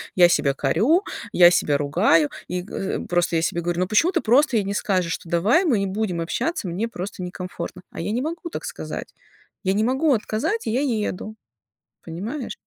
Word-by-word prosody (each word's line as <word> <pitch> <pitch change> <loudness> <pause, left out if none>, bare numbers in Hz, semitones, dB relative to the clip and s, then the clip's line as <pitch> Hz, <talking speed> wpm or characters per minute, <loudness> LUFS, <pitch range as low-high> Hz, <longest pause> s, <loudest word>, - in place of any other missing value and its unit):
я 175 -1 +7
себя 140 -5 +2
корю, 210 - +2 0.3
я 175 -1 +7
себя 145 -4 +2
ругаю, 145 +2 +3 0.2
и, 180 0 -3
э, 195 - -3
просто 175 -1 0
я - - +1
себе 170 +1 -1
говорю: 175 0 -2
"Ну, 185 - +1
почему 270 - +3
ты - - 0
просто 250 +2 +3
ей 210 - +1
не 200 - -2
скажешь, 185 -5 0
что: 165 - -7
"Давай 210 - +3
мы 250 - +2
не 195 - 0
будем 190 -3 -2
общаться, 235 - -2
мне 185 +7 -2
просто 190 -3 -6
некомфортно"?" 180 0 -6
А - - -8
я 185 +5 -2
не 235 +3 0
могу 335 +4 -4
так - - -6
сказать, - - -6 0.5
я 190 -1 +1
не 210 +2 +1
могу 265 +5 +2
отказать, 230 - -1
и - - 0
я 250 +4 +1
еду, 215 -5 -2 0.7
понимаешь? 220 - -5
195 Hz, 200 wpm, -23 LUFS, 175-240 Hz, 0.7 s, я